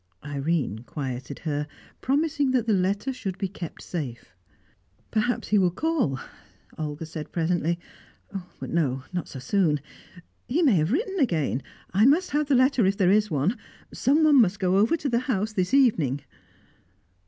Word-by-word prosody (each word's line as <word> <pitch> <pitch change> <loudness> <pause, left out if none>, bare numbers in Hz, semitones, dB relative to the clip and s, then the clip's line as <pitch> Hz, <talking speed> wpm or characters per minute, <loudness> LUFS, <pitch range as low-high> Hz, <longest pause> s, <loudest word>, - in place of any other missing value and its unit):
Irene 145 -5 -1
quieted 130 0 -5
her, 150 -2 -3 0.3
promising 285 0 +1
that 245 -3 +2
the 225 - +2
letter 200 +7 0
should 195 -7 -5
be 195 - -1
kept 180 -3 -8
safe. 125 - -6 0.8
"Perhaps 225 +3 0
he 210 - +4
will 185 -2 +4
call," 255 - 0 0.6
Olga 155 0 -4
said 155 -1 -7
presently. 170 0 0 0.8
"But - - -6
no, 135 -6 0
not 175 -2 -2
so - - -8
soon. 150 +2 +1 0.7
He 320 +8 +1
may 275 -7 +5
have 155 +4 +1
written 390 - -1
again. 155 - +1 0.3
I 210 +6 +5
must 330 +7 +3
have 295 0 +1
the 280 - +3
letter 255 -1 +4
if 195 +1 +1
there 185 -1 +4
is 210 +1 +3
one. 160 - 0 0.3
Someone 295 0 +5
must 200 -2 +1
go 185 0 +2
over 225 +12 +3
to 290 - -3
the 235 -3 +2
house 215 -1 0
this 185 -3 0
evening." 175 - +3
190 Hz, 160 wpm, -26 LUFS, 155-255 Hz, 0.8 s, may